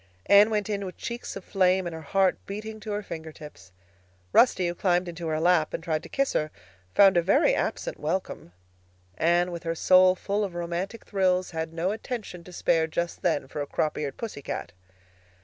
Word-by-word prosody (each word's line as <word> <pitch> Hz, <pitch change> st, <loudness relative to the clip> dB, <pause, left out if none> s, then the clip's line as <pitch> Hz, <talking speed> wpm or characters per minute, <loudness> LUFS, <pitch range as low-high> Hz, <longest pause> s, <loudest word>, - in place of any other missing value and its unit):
Anne 205 Hz, +2 st, +7 dB
went 210 Hz, -2 st, -1 dB
in 205 Hz, -2 st, -2 dB
with 185 Hz, -2 st, -7 dB
cheeks 235 Hz, +1 st, -6 dB
of 195 Hz, -, -8 dB
flame 185 Hz, -1 st, +2 dB
and 170 Hz, -, -4 dB
her 160 Hz, -, -7 dB
heart 190 Hz, +4 st, +2 dB
beating 215 Hz, +2 st, -6 dB
to 215 Hz, 0 st, -6 dB
her 205 Hz, 0 st, -2 dB
fingertips. 155 Hz, -, -10 dB, 0.6 s
Rusty, 190 Hz, -7 st, +4 dB
who 175 Hz, -, -1 dB
climbed 180 Hz, 0 st, +1 dB
into 170 Hz, -1 st, -6 dB
her 155 Hz, 0 st, -1 dB
lap 170 Hz, -2 st, +2 dB
and -, -, -6 dB
tried 160 Hz, -3 st, -1 dB
to -, -, -12 dB
kiss 275 Hz, 0 st, 0 dB
her, 155 Hz, -, 0 dB, 0.5 s
found 195 Hz, -2 st, +6 dB
a -, -, +5 dB
very 270 Hz, -, +3 dB
absent -, -, -2 dB
welcome. 165 Hz, -, -3 dB, 0.7 s
Anne, 175 Hz, +2 st, +2 dB
with 170 Hz, -1 st, -6 dB
her 165 Hz, -1 st, -3 dB
soul 185 Hz, +2 st, +5 dB
full 205 Hz, +3 st, -1 dB
of 190 Hz, -4 st, -4 dB
romantic 175 Hz, +6 st, -4 dB
thrills, 185 Hz, -2 st, +1 dB
had 160 Hz, -1 st, -4 dB
no 170 Hz, +3 st, -1 dB
attention 215 Hz, -5 st, -6 dB
to 180 Hz, -, -11 dB
spare 165 Hz, -2 st, +1 dB
just 170 Hz, +2 st, -3 dB
then 160 Hz, -6 st, 0 dB
for 145 Hz, -, -5 dB
a 145 Hz, -, -4 dB
crop 155 Hz, +2 st, -1 dB
eared 145 Hz, -3 st, -4 dB
pussy 220 Hz, -11 st, -6 dB
cat. -, -, -5 dB
180 Hz, 200 wpm, -26 LUFS, 165-200 Hz, 0.7 s, Anne